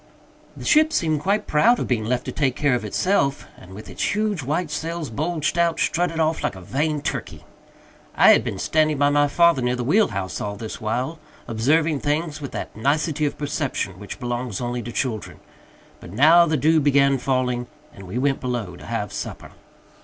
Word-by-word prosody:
The - - -8
ship 310 +1 +4
seemed 155 - +1
quite 200 +6 0
proud 230 +11 +4
of - - -2
being 110 -4 0
left 125 +2 -1
to - - -4
take 135 -4 0
care 145 -3 +1
of 120 - -1
itself, 140 - 0
and, 95 +1 -13
with 105 - -10
its - - -2
huge 210 -5 0
white 150 +5 -2
sails 165 -4 -4
bulged 155 +5 -1
out, 170 -1 +2
strutted 170 -1 0
off 160 0 +1
like - - -2
a 95 - -10
vain 145 - -2
turkey. - - -4 0.7
I - - +7
had - - +4
been - - -4
standing 155 -1 +1
by 145 +1 +3
my 145 0 +3
father 170 -1 +3
near 125 0 0
the 125 - -3
wheel 200 - +3
house 95 -1 -4
all 100 0 -3
this 110 +1 -7
while, 125 +9 -2 0.3
observing 145 +7 +1
things 150 +1 -2
with 140 - -6
that - - -6
nicety 150 +5 0
of - - -5
perception 140 - -3
which 105 - -8
belongs 120 -3 -3
only 120 0 -3
to 120 - -7
children; 115 -4 -3 0.6
but - - -11
now 160 - +6
the 155 -1 +1
dew 160 +4 +3
began 140 -2 +3
falling, 125 -1 -1 0.3
and 95 -1 -12
we 95 +7 -5
went 135 +1 +1
below 120 -8 -3
to - - -12
have - - -3
supper. - - -6
145 Hz, 200 wpm, -22 LUFS, 120-160 Hz, 0.7 s, I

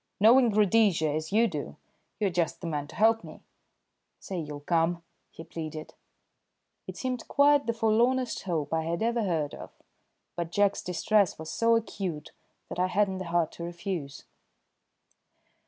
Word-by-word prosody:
Knowing 235 +4 +6
Rhodesia 205 -6 +3
as 155 +3 -3
you 225 +3 +4
do, - - -5 0.4
you're 205 -3 +1
just 170 -1 -1
the - - -8
man 150 -3 -3
to - - -13
help 225 +1 +3
me. - - -12 0.8
Say 185 -2 -5
you'll 150 -2 -6
come?" 170 +2 0 0.3
he 165 - -11
pleaded. 155 -1 -7 0.9
It - - -7
seemed 255 -2 -3
quite 285 0 +4
the 230 - +1
forlornest 235 +3 +1
hope 160 -5 -2
I 160 - +1
had 170 +4 -2
ever 235 +1 +1
heard 165 -8 -1
of, - - -9 0.7
but 170 -1 -4
Jack's 205 +1 +2
distress 195 +2 +1
was 160 0 -7
so 230 0 +3
acute 190 -8 -3 0.4
that - - -5
I 180 - +3
hadn't 190 0 0
the 185 - -5
heart 170 -1 0
to 170 - -8
refuse. 170 -4 -5
185 Hz, 155 wpm, -28 LUFS, 165-225 Hz, 0.9 s, Knowing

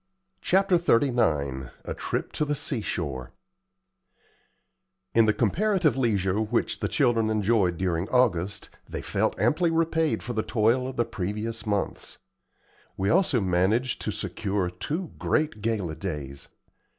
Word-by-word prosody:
CHAPTER 190 -1 +3
XXXIX 80 - +1 0.2
A - - -3
TRIP - - -3
TO - - -1
THE 145 0 0
SEASHORE 80 - -3 1.8
In 115 -1 +5
the 110 - +4
comparative 165 - +2
leisure 105 -6 +1
which 110 - 0
the - - -1
children 115 -2 +2
enjoyed 105 -4 +2
during 90 0 -1
August, 100 -7 +1 0.2
they - - -5
felt - - -1
amply 155 - +2
repaid 160 -5 +1
for 120 +2 -4
the 110 - 0
toil 115 +4 +1
of 130 - -6
the 120 - +1
previous 105 +4 -4
months. 100 -2 -2 0.8
We 95 +1 +1
also 170 -8 +3
managed 95 +7 +1
to 105 - -2
secure 100 -3 -2
two 150 - -4
great 150 -9 0
gala 100 -8 -1
days. 75 -6 -5
110 Hz, 130 wpm, -26 LUFS, 95-130 Hz, 1.8 s, In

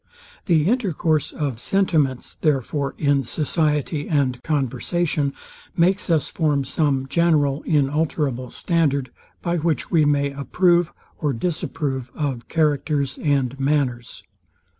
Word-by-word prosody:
The 165 -3 +3
intercourse 175 - +1
of 140 -7 -3
sentiments, 155 -8 +1
therefore, 140 -1 0
in 140 -2 +2
society 150 +2 -1
and 135 -5 +1
conversation, 150 +1 0 0.5
makes 185 +4 +2
us 160 -4 +1
form 145 -4 +1
some 135 -2 0
general 150 -3 +2
inalterable 145 -3 0
standard, 140 -7 0 0.3
by 175 0 0
which 160 -4 -1
we 160 -3 +4
may 140 -1 +2
approve 175 +5 +2 0.3
or 145 -2 0
disapprove 135 -2 -3
of 135 -6 -3
characters 145 -3 0
and 140 -3 0
manners. 135 -4 -1
145 Hz, 110 wpm, -22 LUFS, 135-160 Hz, 0.5 s, we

